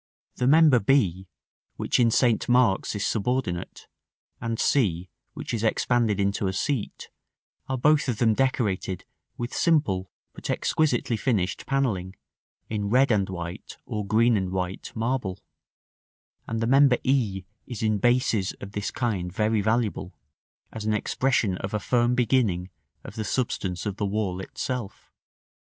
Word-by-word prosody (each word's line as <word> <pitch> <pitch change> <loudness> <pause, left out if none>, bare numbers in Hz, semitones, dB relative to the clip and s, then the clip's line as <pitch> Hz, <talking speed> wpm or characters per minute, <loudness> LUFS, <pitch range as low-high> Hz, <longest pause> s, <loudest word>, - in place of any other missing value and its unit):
The 125 - +1
member 150 -3 +6
b, 95 -7 +1 0.5
which - - 0
in 120 -2 +5
St. 120 0 +2
Mark's 120 -5 +3
is 100 - -1
subordinate, 110 -5 -2 0.6
and 115 -1 -2
c, 95 - +1 0.2
which - - -5
is 115 -2 -2
expanded 115 -2 +1
into 100 0 0
a 95 - -1
seat, 120 +4 -3 0.6
are 130 - 0
both 150 +2 +3
of 120 - -1
them 110 0 +3
decorated 105 -7 -1 0.3
with 120 -2 -4
simple 100 - +1 0.2
but - - -8
exquisitely 125 -6 +1
finished 105 -7 -1
panelling, 105 -10 -1 0.5
in 105 -2 -2
red 130 +3 +4
and 100 -3 +1
white 85 -2 -7
or 105 -1 -3
green 110 +4 +3
and 95 -2 -2
white 90 0 -4
marble; 115 -5 -2 1.1
and 115 0 -2
the - - +1
member 135 0 +5
e 115 -8 +1 0.2
is 120 -3 -5
in 110 -1 +1
bases 120 -4 +2
of 100 - -10
this 100 0 -3
kind 100 -8 -2
very 105 +2 +1
valuable, 110 -3 -1 0.6
as 110 - -6
an 110 0 +1
expression 110 -4 0
of 95 +2 -4
a - - 0
firm 120 +2 +1
beginning 110 -8 +1 0.3
of - - -9
the 110 - -4
substance 95 -6 -2
of 100 -1 -3
the 105 - -1
wall 100 -3 -2
itself. 120 +2 -5
110 Hz, 145 wpm, -26 LUFS, 95-125 Hz, 1.1 s, member